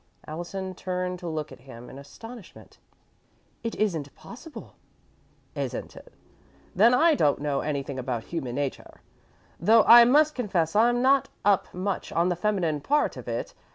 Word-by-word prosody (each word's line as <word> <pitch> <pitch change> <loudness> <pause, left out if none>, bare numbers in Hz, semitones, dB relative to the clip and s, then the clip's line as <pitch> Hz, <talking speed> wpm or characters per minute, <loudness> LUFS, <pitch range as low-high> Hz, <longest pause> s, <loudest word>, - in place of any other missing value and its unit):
Allison 185 +4 -6
turned 180 0 -4
to 175 - -7
look 155 -2 -4
at - - -12
him 125 -2 -12
in 135 - -11
astonishment. 225 - -13 0.8
"It 230 - -3
isn't 160 -10 -2
possible!" 300 +6 -12 0.8
"Isn't - - -5
it? - - -14 0.6
Then 230 +6 +5
I 325 +5 +4
don't 150 - +2
know 145 -1 -1
anything 140 -2 -3
about 125 -3 -3
human 130 -8 -5
nature, 140 -1 -5 0.6
though 225 0 +5
I 235 0 +9
must 300 +5 +4
confess 190 - -1
I'm 240 +3 +3
not 270 0 +3 0.2
up 200 -1 +2
much 185 +2 -4
on 170 +2 +1
the 175 - 0
feminine 175 -6 -1
part 295 - +1
of - - -10
it. - - -4
185 Hz, 155 wpm, -26 LUFS, 150-230 Hz, 0.8 s, I